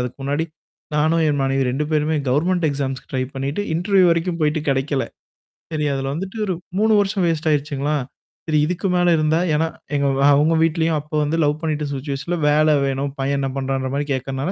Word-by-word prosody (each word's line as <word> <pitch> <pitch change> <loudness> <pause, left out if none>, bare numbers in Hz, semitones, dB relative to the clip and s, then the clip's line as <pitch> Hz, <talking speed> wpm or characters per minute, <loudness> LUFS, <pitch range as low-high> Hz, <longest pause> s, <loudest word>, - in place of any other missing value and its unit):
அதுக்கு 125 0 -4
முன்னாடி 145 +4 -1 0.5
நானும், 160 +2 +2
என் 145 - 0
மனைவி 135 0 +1
2 145 +4 -1
பேருமே 155 0 +1
கவர்ன்மென்ண்ட் 170 +5 +1
எக்ஸாம்ஸ்க்கு 135 -2 -4
ட்ரை 130 - 0
பண்ணீட்டு 140 +8 -2
இன்டர்வியூ 185 +2 +3
வரைக்கும் 170 +1 0
போயிட்டு 155 +1 +1
கெடைக்கல. 135 0 0 0.7
சரி 150 -1 0
அதில 135 0 -2
வந்துட்டு 190 +7 -5
ஒரு 185 - -1 0.2
3 220 0 +4
வருஷம் 195 -2 +1
வேஸ்ட் 160 -1 0
ஆயிருச்சுங்களா? 145 0 0 0.5
சரி 155 -1 +2
இதுக்கு 180 +2 -2
மேல 175 -1 +4
இருந்தா 155 +1 +2 0.2
ஏன்னா 160 +2 +1 0.3
எங்க 140 0 +1
வா 140 - +4
அவுங்க 155 +3 +3
வீட்லயும் 165 -1 +1
அப்ப 150 +1 -20
வந்து 155 +3 -1
லவ் 150 +1 0
பண்ணிட்ட 155 -2 -1
சிச்சுவேஷன்ல 140 +5 -3
வேல 155 +1 +4
வேணும், 135 +1 -1
பையன் 140 +1 0
என்னா 135 -1 -1
பண்றான்ற 135 0 -2
மாரி 145 +1 -1
கேக்கறனால, 135 +5 -3
150 Hz, 180 wpm, -21 LUFS, 140-165 Hz, 0.7 s, 3